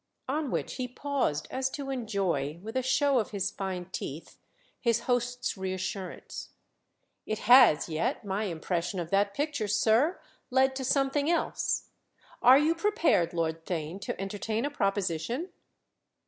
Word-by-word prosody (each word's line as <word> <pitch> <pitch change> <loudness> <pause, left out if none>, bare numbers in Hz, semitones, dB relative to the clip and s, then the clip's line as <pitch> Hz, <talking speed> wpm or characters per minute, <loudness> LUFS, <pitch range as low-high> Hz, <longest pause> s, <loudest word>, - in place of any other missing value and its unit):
On 295 +1 -1
which - - -3
he 255 - -2
paused 250 - -1
as 260 0 0
to 275 0 -5
enjoy, 190 - -1
with 220 +3 -7
a 260 - +2
show 265 +1 +3
of 215 - -2
his 200 -1 -2
fine 190 -2 -4
teeth, 150 -1 -6 0.4
his 235 -2 +2
host's 245 0 -1
reassurance. 190 0 -5 0.8
"It 215 - -1
has 245 - +7
yet, 195 - -2
my 200 +2 -1
impression 175 +1 -2
of 170 -1 -5
that 200 0 +2
picture, 285 -7 -1
sir, 225 - +3 0.3
led 265 +1 +3
to 265 - -3
something 275 +3 +1
else. 340 - 0 0.5
Are 255 +2 +8
you 305 +3 +3
prepared, 335 - +2
Lord 165 -1 -2
Theign, 170 +2 -3
to 195 - -4
entertain 215 +4 -2
a 290 - -2
proposition?" 200 - -1
220 Hz, 145 wpm, -29 LUFS, 185-265 Hz, 0.8 s, Are